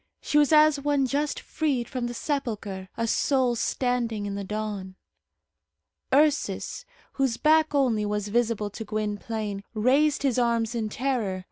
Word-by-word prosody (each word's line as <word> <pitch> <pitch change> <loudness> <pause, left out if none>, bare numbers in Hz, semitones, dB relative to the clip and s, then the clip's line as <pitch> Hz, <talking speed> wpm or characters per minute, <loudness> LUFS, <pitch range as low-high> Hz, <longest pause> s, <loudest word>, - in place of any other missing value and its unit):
She 295 - +2
was 295 0 +3
as 305 -1 +6
one 285 -1 +1
just 285 +3 -1
freed 275 -7 -1
from 250 -3 -3
the 240 - -6
sepulchre; 215 -10 -3
a 230 - 0
soul 255 +1 +2
standing 235 -3 -1
in 200 - -3
the 200 0 -4
dawn. 205 -2 -4 1.2
Ursus, 300 - +1 0.3
whose 265 -4 0
back 310 0 +3
only 230 -7 +2
was 210 0 -2
visible 225 -2 0
to 225 - -6
Gwynplaine, 210 -1 -3
raised 275 +7 +3
his 255 -3 +2
arms 235 -1 +1
in 225 -2 -2
terror. 230 -6 -1
235 Hz, 145 wpm, -26 LUFS, 210-275 Hz, 1.2 s, as